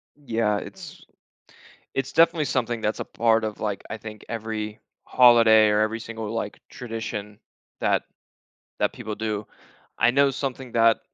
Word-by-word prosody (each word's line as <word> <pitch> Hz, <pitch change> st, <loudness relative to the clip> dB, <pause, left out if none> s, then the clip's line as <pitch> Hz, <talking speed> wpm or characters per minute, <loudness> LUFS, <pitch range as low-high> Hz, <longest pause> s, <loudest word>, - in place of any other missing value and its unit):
Yeah, 115 Hz, -7 st, 0 dB
its -, -, -9 dB, 0.9 s
It's 135 Hz, 0 st, -2 dB
definitely 165 Hz, 0 st, +4 dB
something 120 Hz, -4 st, -1 dB
that's 110 Hz, 0 st, -1 dB
a -, -, -2 dB
part 115 Hz, -1 st, +2 dB
of, 110 Hz, -1 st, -4 dB
like, 105 Hz, -2 st, -2 dB
I 115 Hz, -, -3 dB
think, 110 Hz, -1 st, -10 dB
every 110 Hz, -1 st, -4 dB, 0.3 s
holiday 115 Hz, -3 st, +6 dB
or 105 Hz, 0 st, +3 dB
every 110 Hz, +1 st, 0 dB
single, 115 Hz, -2 st, -6 dB
like, 110 Hz, -2 st, -4 dB
tradition 110 Hz, -3 st, -6 dB, 0.4 s
that -, -, +1 dB, 0.8 s
that -, -, +1 dB
people 110 Hz, -1 st, -6 dB
do. 105 Hz, -1 st, -3 dB, 0.5 s
I 120 Hz, -, +5 dB
know 140 Hz, +2 st, +4 dB
something 130 Hz, -2 st, -4 dB
that 115 Hz, -1 st, +4 dB
115 Hz, 145 wpm, -25 LUFS, 110-120 Hz, 0.9 s, holiday